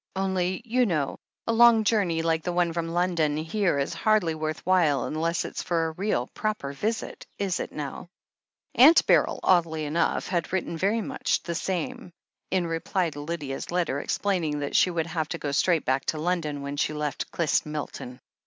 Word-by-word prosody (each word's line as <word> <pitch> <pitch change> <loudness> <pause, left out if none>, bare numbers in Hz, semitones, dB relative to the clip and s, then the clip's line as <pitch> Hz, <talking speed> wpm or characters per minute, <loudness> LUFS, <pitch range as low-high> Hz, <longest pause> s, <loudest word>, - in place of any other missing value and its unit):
Only, 190 +1 -1
you 245 +1 +2
know, 155 -7 -1 0.3
a 230 - 0
long 230 -1 +6
journey 195 -7 +1
like 165 -1 +1
the 180 - -2
one 175 -1 +1
from 170 0 -2
London 170 -3 +1
here 170 +1 0
is 140 - -1
hardly 215 -7 +2
worth 155 0 -4
while 165 -7 +3
unless 165 +2 -1
it's - - -5
for 165 -2 0
a 160 - -2
real, 170 - -1
proper 215 -10 -3
visit, 220 +10 -3
is 190 -4 -1
it - - -4
now?" 150 +2 -6 0.7
Aunt 295 +7 +7
Beryl, - - +3
oddly 165 -4 +2
enough, 155 +3 0
had 175 -3 -2
written 185 -2 -2
very 200 +7 +1
much - - -1
the 170 - -3
same, 190 +5 -3 0.4
in 185 -2 +1
reply 165 +1 -1
to 145 - -9
Lydia's 145 -3 -5
letter, 170 -6 0
explaining 170 -4 -1
that 145 - -3
she - - +5
would 170 -2 -1
have 160 -2 -3
to - - -3
go 145 - -3
straight 165 +2 +2
back 130 +1 0
to 155 - -1
London 155 -3 -2
when 140 +1 -5
she 150 - 0
left 150 -1 -3
Clyst 165 -2 0
Milton. 145 -4 -6
170 Hz, 185 wpm, -26 LUFS, 155-190 Hz, 0.7 s, Aunt